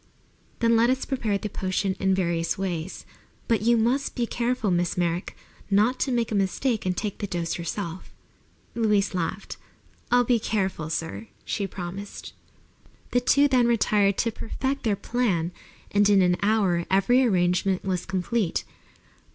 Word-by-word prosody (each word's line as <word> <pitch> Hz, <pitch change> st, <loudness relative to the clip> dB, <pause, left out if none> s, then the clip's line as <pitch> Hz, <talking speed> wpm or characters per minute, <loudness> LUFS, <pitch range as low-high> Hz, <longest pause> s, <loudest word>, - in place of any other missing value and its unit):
"Then 230 Hz, 0 st, +4 dB
let 230 Hz, +1 st, +4 dB
us 260 Hz, +1 st, 0 dB
prepare 225 Hz, -7 st, -1 dB
the 210 Hz, -, -4 dB
potion 190 Hz, -1 st, -1 dB
in 190 Hz, -1 st, +2 dB
various 170 Hz, -3 st, 0 dB
ways. 185 Hz, -2 st, -4 dB, 0.4 s
But 225 Hz, -3 st, +2 dB
you 235 Hz, +2 st, +4 dB
must 250 Hz, +5 st, +1 dB
be 240 Hz, -, 0 dB
careful, 235 Hz, -3 st, -1 dB
Miss 175 Hz, 0 st, 0 dB
Merrick, 175 Hz, 0 st, -1 dB, 0.3 s
not 215 Hz, +6 st, +3 dB
to 270 Hz, -, 0 dB
make 235 Hz, -2 st, 0 dB
a -, -, -1 dB
mistake 205 Hz, +3 st, 0 dB
and 180 Hz, -1 st, -1 dB
take 210 Hz, -3 st, -3 dB
the 205 Hz, -, -3 dB
dose 170 Hz, -2 st, -3 dB
yourself." 170 Hz, +1 st, -5 dB, 0.6 s
Louise 210 Hz, -4 st, +1 dB
laughed. 185 Hz, +2 st, -3 dB, 0.5 s
"I'll 245 Hz, 0 st, +4 dB
be 240 Hz, -1 st, +2 dB
careful, 190 Hz, -8 st, -2 dB
sir," 165 Hz, +7 st, -4 dB, 0.2 s
she 200 Hz, -2 st, -2 dB
promised. 190 Hz, +2 st, -7 dB, 0.8 s
The 245 Hz, -, +3 dB
two 280 Hz, +3 st, +4 dB
then 255 Hz, -3 st, +3 dB
retired 205 Hz, -4 st, +2 dB
to 230 Hz, -, +1 dB
perfect 265 Hz, +5 st, -3 dB
their 215 Hz, -4 st, +1 dB
plan, 195 Hz, -8 st, -1 dB, 0.4 s
and 205 Hz, 0 st, +4 dB
in 195 Hz, -2 st, +5 dB
an 180 Hz, 0 st, +2 dB
hour 200 Hz, -5 st, +2 dB
every 195 Hz, +7 st, +4 dB
arrangement 185 Hz, -3 st, +1 dB
was 185 Hz, -2 st, -2 dB
complete. 190 Hz, +1 st, -1 dB
200 Hz, 155 wpm, -25 LUFS, 180-235 Hz, 0.8 s, in